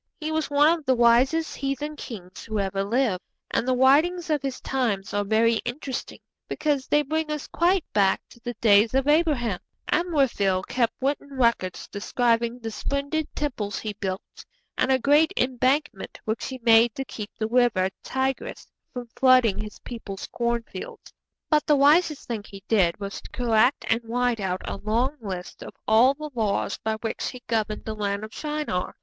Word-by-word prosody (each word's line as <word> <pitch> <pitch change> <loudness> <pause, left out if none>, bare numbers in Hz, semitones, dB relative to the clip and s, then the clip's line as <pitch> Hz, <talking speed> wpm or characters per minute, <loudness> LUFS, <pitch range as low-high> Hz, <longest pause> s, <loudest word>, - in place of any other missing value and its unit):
He 310 0 -3
was 315 0 -1
one 295 +3 +5
of - - -16
the 260 - +4
wisest 250 +7 +3
heathen 275 +2 -3
kings 190 -10 -9
who 220 -1 -3
ever 195 -1 -1
lived, 220 -3 0 0.3
and 245 - 0
the 255 - +2
writings 315 +7 +3
of 300 -2 +1
his 270 -2 -4
times 225 -8 -2
are 205 0 +1
very 225 +3 +3
interesting, 260 +2 -5 0.3
because 290 -3 -1
they 295 0 +3
bring 315 +2 -2
us 300 -2 -3
quite 355 +1 +1
back 195 -2 +3
to 235 - -17
the 240 0 -6
days 220 +1 +4
of 270 +1 +2
Abraham. 295 - +2 0.3
Amraphel 265 - +1
kept 235 -3 0
written 280 0 -2
records 235 -7 +1
describing 235 +3 0
the 225 -2 -6
splendid 280 +7 -2
temples 225 -9 -3
he 215 -1 -4
built, 190 0 -6 0.3
and 265 - +1
a 260 - +5
great 295 +7 +3
embankment 255 -2 0
which 220 +1 -2
he 260 -1 -6
made 230 0 +5
to 270 - -4
keep 210 -4 -7
the 220 - -1
river 225 -6 +2
Tigris 265 0 -3 0.3
from 245 -1 -6
flooding 255 -5 +4
his 210 -1 -6
people's 205 -5 -7
cornfields; 235 -5 -4 0.3
but 305 -1 +2
the 300 - +5
wisest 300 +2 +3
thing 225 -4 -3
he 195 -1 -12
did 190 -6 +2
was 200 -1 -5
to - - -12
collect 245 +2 +2
and 225 +1 +2
write 240 0 0
out 185 -2 -3
a - - -3
long 235 +8 0
list 185 -4 -6
of - - -9
all 235 +6 +5
the 305 +1 -7
laws 210 -4 -1
by 220 0 -1
which 225 - -3
he 250 -1 -10
governed 215 -2 -2
the 220 - -3
land 200 -1 -2
of 215 - -8
Shinar. 300 -12 -3
240 Hz, 175 wpm, -25 LUFS, 215-280 Hz, 0.3 s, one